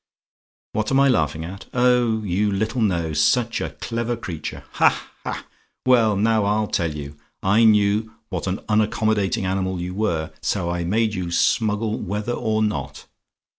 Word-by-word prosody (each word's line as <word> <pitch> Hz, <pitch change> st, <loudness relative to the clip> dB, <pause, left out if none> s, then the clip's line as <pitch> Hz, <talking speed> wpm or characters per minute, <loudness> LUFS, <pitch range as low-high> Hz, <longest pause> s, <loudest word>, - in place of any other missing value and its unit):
"WHAT 110 Hz, 0 st, -1 dB
AM 135 Hz, -, +4 dB
I 140 Hz, 0 st, +5 dB
LAUGHING 80 Hz, -, +1 dB
AT? 95 Hz, +3 st, -9 dB
"Oh, 125 Hz, -3 st, +3 dB
you 100 Hz, +2 st, 0 dB
little 110 Hz, +5 st, -1 dB
know 85 Hz, -7 st, 0 dB
such 110 Hz, +11 st, +2 dB
a -, -, -2 dB
clever 115 Hz, 0 st, -2 dB
creature! 85 Hz, -8 st, -6 dB
Ha! -, -, +2 dB
ha! -, -, -5 dB, 0.4 s
Well, 115 Hz, -5 st, +4 dB
now, 110 Hz, +1 st, +2 dB
I'll 105 Hz, +1 st, +1 dB
tell 85 Hz, -5 st, -1 dB
you. 75 Hz, 0 st, -7 dB, 0.3 s
I 105 Hz, +4 st, +4 dB
knew 105 Hz, 0 st, +3 dB, 0.2 s
what 95 Hz, -1 st, -4 dB
an 95 Hz, +2 st, -2 dB
unaccommodating 110 Hz, -1 st, +1 dB
animal 95 Hz, -1 st, -1 dB
you 90 Hz, +1 st, -4 dB
were, 85 Hz, -7 st, -1 dB
so 85 Hz, +1 st, -1 dB
I 85 Hz, 0 st, -2 dB
made 110 Hz, +4 st, +1 dB
you 90 Hz, -3 st, -3 dB
smuggle 105 Hz, +5 st, +1 dB
whether 105 Hz, +5 st, -3 dB
or 110 Hz, -2 st, 0 dB
not. 70 Hz, -11 st, -3 dB
105 Hz, 160 wpm, -22 LUFS, 90-110 Hz, 0.4 s, I